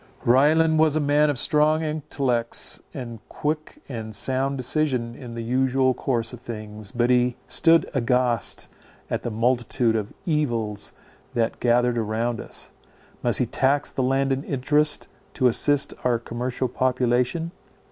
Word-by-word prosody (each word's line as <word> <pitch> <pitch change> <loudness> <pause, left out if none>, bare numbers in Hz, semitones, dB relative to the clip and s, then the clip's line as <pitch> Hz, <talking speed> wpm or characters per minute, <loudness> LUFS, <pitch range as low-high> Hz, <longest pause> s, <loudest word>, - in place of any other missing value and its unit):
Ryland 155 +6 +4
was 155 -1 +4
a - - +2
man 145 +1 +3
of 145 - -1
strong 155 +4 +3
intellects 135 -6 -2
and 120 -3 -7
quick 155 +1 -4
and 110 -4 -6
sound 135 +6 +1
decision 130 -3 -1
in 120 -1 -9
the 115 - -4
usual 130 +2 +2
course 120 -2 -2
of 125 - -8
things, 110 -3 -7
but 120 0 +1
he 125 0 +2
stood 165 0 +4
aghast 125 -2 +1 0.4
at - - -1
the - - -3
multitude 120 +1 +1
of 105 -1 -2
evils 120 - -1 0.4
that 115 -1 0
gathered 120 0 +2
round 115 +1 -2
us. - - -7 0.5
Must - - +3
he - - +2
tax 140 +2 +1
the - - -2
landed 135 +1 +1
interest 150 +3 +1 0.3
to 130 - 0
assist 140 +4 +3
our 125 -2 +2
commercial 125 +2 -3
population? 125 +6 0
125 Hz, 140 wpm, -24 LUFS, 120-145 Hz, 0.5 s, Ryland